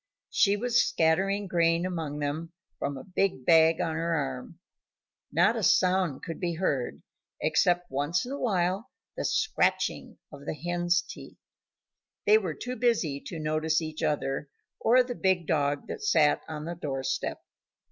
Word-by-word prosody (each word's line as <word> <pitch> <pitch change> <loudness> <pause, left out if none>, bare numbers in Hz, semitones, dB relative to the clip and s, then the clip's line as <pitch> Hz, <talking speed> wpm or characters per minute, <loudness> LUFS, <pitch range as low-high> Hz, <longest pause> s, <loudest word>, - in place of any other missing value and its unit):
She 200 0 +3
was 245 +2 +2
scattering 195 +2 +1
grain 170 -1 +2
among 165 -5 -3
them 150 +3 -3 0.3
from 140 -1 -2
a 130 - -8
big 185 -8 -1
bag 165 -1 +5
on 160 - -1
her 165 +1 -1
arm; 135 +2 -4 0.7
not - - +3
a - - -2
sound 180 -6 +2
could 165 - -6
be 175 -2 -2
heard 145 -8 -2 0.4
except 175 -2 +1
once 145 - 0
in 250 - -7
a 280 - -4
while 190 -1 0 0.3
the - - -3
scratching 440 0 0
of 140 - -12
the - - -2
hens' 175 +2 0
feet. - - -11 0.9
They 215 +1 +6
were 180 -7 -4
too 250 +1 -5
busy 215 - +1
to 170 - -6
notice 155 +1 0
each 155 -1 -6
other 145 -2 -1 0.3
or 250 +2 +5
the 245 0 -5
big 190 -6 +1
dog 145 -2 0
that 440 - -6
sat 370 - +3
on 155 -1 -6
the 170 - -4
door 140 -6 -4
step. 130 0 -2
165 Hz, 160 wpm, -28 LUFS, 150-190 Hz, 0.9 s, They